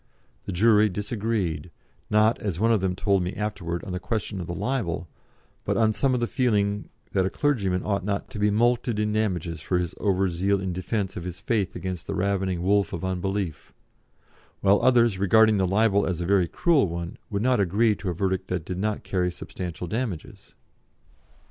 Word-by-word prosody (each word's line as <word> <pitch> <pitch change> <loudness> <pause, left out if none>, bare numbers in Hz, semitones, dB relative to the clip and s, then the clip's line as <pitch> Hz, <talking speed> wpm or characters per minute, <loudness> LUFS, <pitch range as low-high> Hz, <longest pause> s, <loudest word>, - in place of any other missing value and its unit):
The - - -4
jury 105 +3 +4
disagreed, 100 -5 -2 0.4
not, 110 +2 +3
as 95 -5 -3
one 115 +2 +3
of 110 -4 +3
them 95 -1 0
told 100 0 +2
me 90 +1 -3
afterwards, 95 -5 -3
on 95 - -6
the 90 - -2
question 100 0 -3
of 85 - -6
the 85 - -4
libel, 100 -6 -2 0.6
but - - 0
on 110 -1 +3
some 130 +1 +1
feeling 105 -5 0 0.2
that 95 -1 +2
a - - -1
clergyman 100 -10 0
ought 100 -3 0
not 100 0 -2
to 110 - -6
be 105 0 +3
mulcted 120 +1 +2
in 105 0 0
damages 90 -6 -1
for 90 - 0
his 90 -2 -2
over 95 -2 +2
zeal 95 +3 +1
in 95 -1 -3
defence 95 +2 -2
of 90 - -5
his 90 0 -6
faith 105 -5 -1
against 90 -3 -5
the - - -3
ravening 95 -2 0
wolf 100 +1 +2
of 85 +1 -3
unbelief, 95 -2 -3 0.9
while 100 +1 +4
others, 120 -6 +4
regarding 110 +2 +5
the 95 -1 +2
libel 100 +1 +3
as 90 -3 -2
a 85 - -2
very 95 -1 +3
cruel 165 - +2
one, 85 +1 -5
would 100 0 -2
not 125 -1 +3
agree 105 +4 +3
to 95 - -4
a - - -1
verdict 95 +1 -1
that 90 -3 -3
did 90 +1 -4
not 105 +1 -1
carry 90 -2 0
substantial 90 -1 -6
damages. 105 -3 -5
100 Hz, 190 wpm, -25 LUFS, 90-110 Hz, 0.9 s, regarding